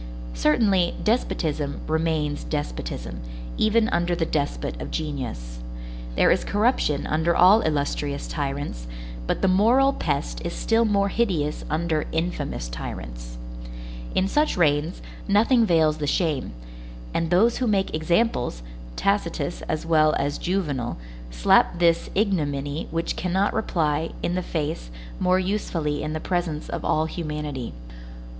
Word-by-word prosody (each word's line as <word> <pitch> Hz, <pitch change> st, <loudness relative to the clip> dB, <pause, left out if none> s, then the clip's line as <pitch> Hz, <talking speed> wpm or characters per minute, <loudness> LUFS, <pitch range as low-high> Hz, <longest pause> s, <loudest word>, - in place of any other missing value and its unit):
Certainly, 175 Hz, -, +3 dB
despotism 155 Hz, -, 0 dB
remains 155 Hz, -2 st, 0 dB
despotism, -, -, -4 dB, 0.4 s
even 220 Hz, +1 st, +3 dB
under 175 Hz, 0 st, +1 dB
the 170 Hz, -1 st, 0 dB
despot 145 Hz, -2 st, -2 dB
of -, -, -5 dB
genius. 125 Hz, -, -4 dB, 0.6 s
There -, -, +5 dB
is -, -, +2 dB
corruption 205 Hz, -, +1 dB
under 160 Hz, +2 st, +1 dB
all 195 Hz, +5 st, +7 dB
illustrious 145 Hz, -1 st, -1 dB
tyrants, 140 Hz, -, -3 dB, 0.4 s
but -, -, -1 dB
the -, -, +5 dB
moral 235 Hz, +9 st, +4 dB
pest 140 Hz, -, -2 dB
is -, -, -3 dB
still 230 Hz, +1 st, +2 dB
more 200 Hz, -2 st, +2 dB
hideous 180 Hz, -10 st, 0 dB
under 155 Hz, 0 st, 0 dB
infamous 160 Hz, -, -2 dB
tyrants. -, -, -7 dB, 0.8 s
In 190 Hz, -, +3 dB
such 300 Hz, +4 st, +1 dB
reigns, 155 Hz, 0 st, +1 dB, 0.2 s
nothing 225 Hz, +3 st, +4 dB
veils 160 Hz, -3 st, +3 dB
the 145 Hz, -, -1 dB
shame; 155 Hz, -, 0 dB, 0.6 s
and 165 Hz, -1 st, 0 dB
those 210 Hz, +7 st, +4 dB
who 255 Hz, -, 0 dB
make 195 Hz, -3 st, +1 dB
examples, 155 Hz, -, +1 dB, 0.3 s
Tacitus 175 Hz, -6 st, 0 dB
as 155 Hz, 0 st, -1 dB
well 155 Hz, -2 st, +4 dB
as 145 Hz, +1 st, -1 dB
Juvenal, 150 Hz, -10 st, -1 dB, 0.3 s
slap -, -, +4 dB
this 170 Hz, -1 st, +3 dB
ignominy 150 Hz, -7 st, 0 dB
which 165 Hz, +1 st, -2 dB
cannot 190 Hz, +3 st, +1 dB
reply, 160 Hz, -7 st, 0 dB
in 175 Hz, -, 0 dB
the 185 Hz, -, 0 dB
face, 155 Hz, -, -3 dB, 0.3 s
more 185 Hz, 0 st, +3 dB
usefully 180 Hz, -6 st, -1 dB
in 155 Hz, 0 st, -3 dB
the 155 Hz, -, -2 dB
presence 175 Hz, -3 st, -2 dB
of -, -, -4 dB
all 155 Hz, +1 st, +2 dB
humanity. 150 Hz, -, -4 dB
160 Hz, 130 wpm, -24 LUFS, 145-190 Hz, 0.8 s, all